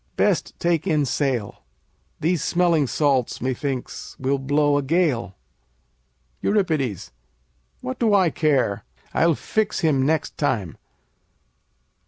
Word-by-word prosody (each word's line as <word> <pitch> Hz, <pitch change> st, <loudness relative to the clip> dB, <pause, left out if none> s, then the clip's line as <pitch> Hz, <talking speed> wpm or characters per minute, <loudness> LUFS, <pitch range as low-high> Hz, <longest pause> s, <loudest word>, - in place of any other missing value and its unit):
Best -, -, +1 dB
take 170 Hz, 0 st, 0 dB
in 155 Hz, -4 st, +2 dB
sail. 130 Hz, -6 st, -2 dB, 0.6 s
These 165 Hz, 0 st, 0 dB
smelling 170 Hz, -5 st, +2 dB
salts, 135 Hz, -3 st, +1 dB
methinks, 130 Hz, +1 st, -4 dB
will 135 Hz, +1 st, 0 dB
blow 145 Hz, +1 st, +2 dB
a -, -, 0 dB
gale. 140 Hz, -, 0 dB, 1.1 s
Eur. 205 Hz, -1 st, +2 dB, 1.2 s
What 130 Hz, -, -5 dB
do 225 Hz, -2 st, +2 dB
I 190 Hz, -5 st, +4 dB
care? 135 Hz, -10 st, +1 dB, 0.3 s
I'll 165 Hz, -1 st, +3 dB
fix 215 Hz, +5 st, -1 dB
him 150 Hz, -6 st, +2 dB
next 155 Hz, +2 st, -1 dB
time. 105 Hz, -, -1 dB
145 Hz, 110 wpm, -23 LUFS, 130-170 Hz, 1.2 s, I